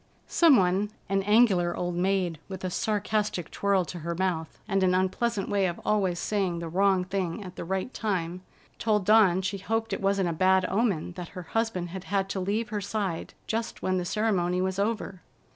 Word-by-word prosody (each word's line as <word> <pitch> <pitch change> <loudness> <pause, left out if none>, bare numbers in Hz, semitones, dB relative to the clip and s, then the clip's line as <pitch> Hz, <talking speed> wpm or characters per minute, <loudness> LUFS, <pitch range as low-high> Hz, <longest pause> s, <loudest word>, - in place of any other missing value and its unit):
Someone—an 200 - +3
angular 195 -5 +4
old 175 0 -2
maid, 180 -2 0
with 190 -1 -7
a 185 - -2
sarcastic 210 -3 -1
twirl 200 -2 +1
to 175 +2 -7
her 170 +1 -3
mouth 175 -3 -2
and 195 -2 +1
an 185 -1 +3
unpleasant 195 +3 0
way 200 -2 +2
of 175 - -4
always 190 -4 +1
saying 190 -3 -1
the 170 0 -4
wrong 190 +2 +2
thing 185 +1 -3
at 185 -1 -9
the - - -5
right 190 +7 -3
time—told 190 +2 -2
Dawn 195 -3 +5
she 200 +1 -2
hoped 225 +3 -2
it - - -3
wasn't 195 -1 +2
a - - -1
bad 185 +3 +3
omen 195 -6 0
that 175 -1 -7
her 180 - -5
husband 205 -2 -2
had 190 +2 -7
had 195 -1 0
to 195 - -2
leave 210 +4 -1
her 210 -1 -2
side 200 -4 -3
just 225 +1 -3
when 185 0 +1
the - - -2
ceremony 180 -3 0
was 190 +1 -1
over. 205 -3 -2
190 Hz, 185 wpm, -27 LUFS, 180-210 Hz, -, Dawn